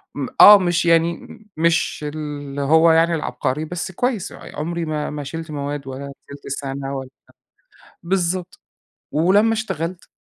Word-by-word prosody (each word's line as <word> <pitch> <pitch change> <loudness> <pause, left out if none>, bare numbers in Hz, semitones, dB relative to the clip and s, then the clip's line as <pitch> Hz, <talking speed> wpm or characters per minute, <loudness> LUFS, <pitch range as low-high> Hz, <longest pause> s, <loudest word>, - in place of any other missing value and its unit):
م 140 -3 -3
آه 205 0 +11
مش 175 -2 0
يعني 165 0 +2 0.3
مش 165 -2 +1
اللي 145 -2 -5
هو 160 +4 +5
يعني 165 +1 +3
العبقري، 150 -1 -2
بس 175 +3 -5
كويِّس، 230 +1 -2
عمري 170 +2 -5
ما 155 -1 -3
ما 150 -1 -5
شِلت 160 +3 -7
مواد 145 -1 -4
ولا 140 +1 -7 0.2
شِلت 140 0 -11
سنة 135 0 -5
ولا 130 -1 -7 0.9
بالضبط. 180 0 -2 0.5
ولمّا 195 +8 +3
اشتغلت، 185 -5 -4
160 Hz, 135 wpm, -21 LUFS, 145-175 Hz, 0.9 s, آه